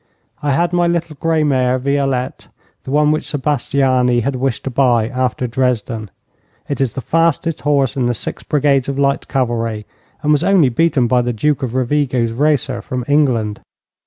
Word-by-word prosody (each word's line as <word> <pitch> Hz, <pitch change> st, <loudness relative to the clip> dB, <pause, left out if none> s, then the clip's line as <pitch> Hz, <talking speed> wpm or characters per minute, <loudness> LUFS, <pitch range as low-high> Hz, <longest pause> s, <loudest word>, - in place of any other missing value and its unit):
I 145 Hz, -1 st, 0 dB
had 170 Hz, +5 st, +1 dB
my 175 Hz, -1 st, +2 dB
little 170 Hz, -2 st, -2 dB
grey 165 Hz, -1 st, +1 dB
mare, 130 Hz, -3 st, +2 dB
Violette, 135 Hz, -1 st, -1 dB, 0.4 s
the -, -, -7 dB
one 150 Hz, +2 st, +3 dB
which 155 Hz, 0 st, 0 dB
Sebastiani 130 Hz, -3 st, +1 dB
had 135 Hz, +3 st, -2 dB
wished 130 Hz, -1 st, -2 dB
to 135 Hz, -, -4 dB
buy 120 Hz, -4 st, +2 dB
after 125 Hz, -1 st, -1 dB
Dresden. 115 Hz, -3 st, -1 dB, 0.6 s
It 140 Hz, -2 st, -3 dB
is 125 Hz, -5 st, -1 dB
the 135 Hz, -, -3 dB
fastest 165 Hz, +2 st, 0 dB
horse 140 Hz, -3 st, +1 dB
in 130 Hz, -3 st, 0 dB
the 120 Hz, -, 0 dB
six -, -, -6 dB
brigades 140 Hz, -2 st, +1 dB
of 140 Hz, -, -3 dB
light 140 Hz, 0 st, 0 dB
cavalry, 115 Hz, -5 st, -2 dB, 0.4 s
and 150 Hz, -, +2 dB
was 150 Hz, -, +3 dB
only 185 Hz, -9 st, +4 dB
beaten 135 Hz, 0 st, +2 dB
by 125 Hz, +1 st, +2 dB
the 120 Hz, 0 st, -2 dB
Duke 145 Hz, +6 st, 0 dB
of 125 Hz, -2 st, -3 dB
Rovigo's 130 Hz, -2 st, 0 dB
racer 140 Hz, 0 st, 0 dB
from 125 Hz, -2 st, -4 dB
England. 125 Hz, -8 st, +1 dB
135 Hz, 175 wpm, -17 LUFS, 125-150 Hz, 0.6 s, only